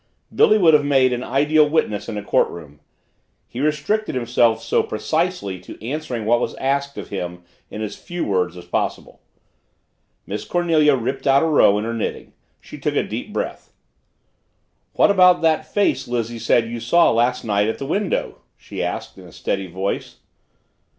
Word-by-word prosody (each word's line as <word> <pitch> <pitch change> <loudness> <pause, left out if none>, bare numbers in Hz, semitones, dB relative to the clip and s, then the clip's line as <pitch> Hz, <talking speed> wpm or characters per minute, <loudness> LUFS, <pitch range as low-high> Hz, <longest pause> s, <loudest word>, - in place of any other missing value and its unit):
Billy 215 - +5
would 170 -6 +5
have 150 -1 +5
made 135 -3 +3
an 125 +1 -3
ideal 150 +4 +3
witness 115 -10 -1
in 105 - -4
a 105 - -5
courtroom. 75 -7 -1 0.7
He 120 - -8
restricted 155 +8 -1
himself 120 -2 +2
so 465 0 +2
precisely 175 - -2
to 90 +4 -12
answering 130 -6 -4
what 120 +2 +3
was - - -3
asked 140 +1 -2
of - - -7
him 90 -3 -5 0.3
in 110 - -6
as 105 -1 -5
few 175 -1 -5
words 90 -3 -1
as 90 - -10
possible. 90 - -3 1.0
Miss 105 +1 -5
Cornelia 160 -4 +2
ripped 130 +3 -3
out 135 +2 +5
a - - +2
row 145 -10 +4
in 105 - -2
her 115 - -3
knitting. 115 - -4 0.3
She - - -12
took - - -2
a - - +2
deep - - -6
breath. - - -5 1.2
"What - - +4
about 180 -3 +5
that 160 -1 +1
face 165 -10 +1
Lizzie 120 -1 -3
said 115 0 +2
you 120 +1 -5
saw 120 +10 +4
last 120 +2 +1
night 105 -1 +1
at 110 - -2
the 135 - -5
window?" 195 +6 -2 0.2
she - - -7
asked - - -4
in - - -13
a - - -14
steady 95 -1 -3
voice. 95 +3 -4
125 Hz, 175 wpm, -21 LUFS, 105-155 Hz, 1.2 s, Billy